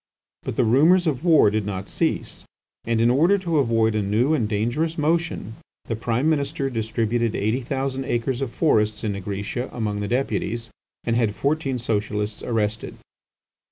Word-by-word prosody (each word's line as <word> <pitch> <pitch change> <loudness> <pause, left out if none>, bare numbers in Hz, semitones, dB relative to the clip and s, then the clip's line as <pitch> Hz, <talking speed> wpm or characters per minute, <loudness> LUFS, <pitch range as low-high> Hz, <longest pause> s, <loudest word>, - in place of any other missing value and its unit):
But - - -5
the 130 - +2
rumours 155 +11 +4
of 150 -3 -1
war 160 - +5
did 110 0 0
not 100 -1 -4
cease, - - -2 0.4
and 115 -1 +1
in 115 +1 +4
order 170 +10 +4
to 170 -5 0
avoid 115 -4 +2
a 110 - 0
new 110 +9 +1
and 115 -9 0
dangerous 120 +10 -1
motion, 160 - -1 0.3
the 115 - -2
Prime 115 +5 0
Minister 140 -2 0
distributed 115 0 -1
eighty 110 +6 0
thousand 135 +1 -3
acres 120 +2 -1
of 135 - -1
forests 110 -9 +1
in 110 - 0
Nigritia 100 +5 -4
among 105 -3 -2
the 105 - -2
Deputies, 115 -1 -2 0.3
and 115 - 0
had 115 -3 +1
fourteen 140 -2 0
Socialists 105 -2 -2
arrested. 110 -2 -2
120 Hz, 160 wpm, -23 LUFS, 110-140 Hz, 0.4 s, war